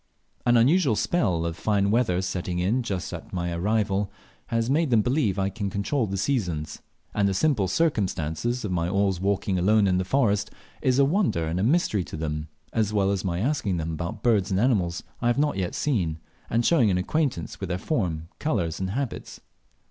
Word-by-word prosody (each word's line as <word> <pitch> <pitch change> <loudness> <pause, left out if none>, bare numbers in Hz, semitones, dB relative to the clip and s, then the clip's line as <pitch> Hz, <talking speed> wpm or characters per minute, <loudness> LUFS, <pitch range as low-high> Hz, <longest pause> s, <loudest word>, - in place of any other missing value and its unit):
An 120 0 +5
unusual 135 +1 +4
spell 95 - +1
of 85 -1 -2
fine 100 +1 +1
weather 105 -6 +2
setting 90 -1 -3
in 100 +9 +1
just 95 -7 -4
at - - -8
my 85 -1 -2
arrival 100 +2 0 0.4
has 115 -1 0
made 150 +3 +2
them 115 -4 +4
believe 125 -6 +1
I 95 0 +1
can 100 +1 -3
control 110 +6 -1
the 95 0 -3
seasons; 90 - -2 0.3
and 100 -1 +2
the 95 - -1
simple 120 -5 +2
circumstance 95 - 0 0.2
of 100 - -3
my 85 -1 0
always 95 -2 +1
walking 100 -1 0
alone 105 +3 +4
in 90 -1 +2
the - - 0
forest 100 -1 +1 0.3
is 130 -2 +2
a 140 - +5
wonder 160 - +1
and 80 +3 -2
a - - 0
mystery 120 - +2
to - - -7
them, 75 0 -3 0.3
as 110 -2 +1
well 100 -2 +2
as 100 -1 -1
my 90 -1 -1
asking 115 - 0
them 80 0 -3
about 85 +2 -5
birds 105 -6 +3
and 95 -1 +1
animals 95 -8 +1 0.2
I 120 - +1
have 120 - +2
not 145 -3 +1
yet 90 -2 -2
seen, 90 - 0 0.3
and 115 +1 +1
showing 135 -11 +4
an 90 - +2
acquaintance 95 - -1
with 95 -2 -4
their 90 - -1
form, 90 - -2
colours, 90 - -1
and 95 0 -2
habits. 130 +4 -4
100 Hz, 200 wpm, -25 LUFS, 90-120 Hz, 0.4 s, An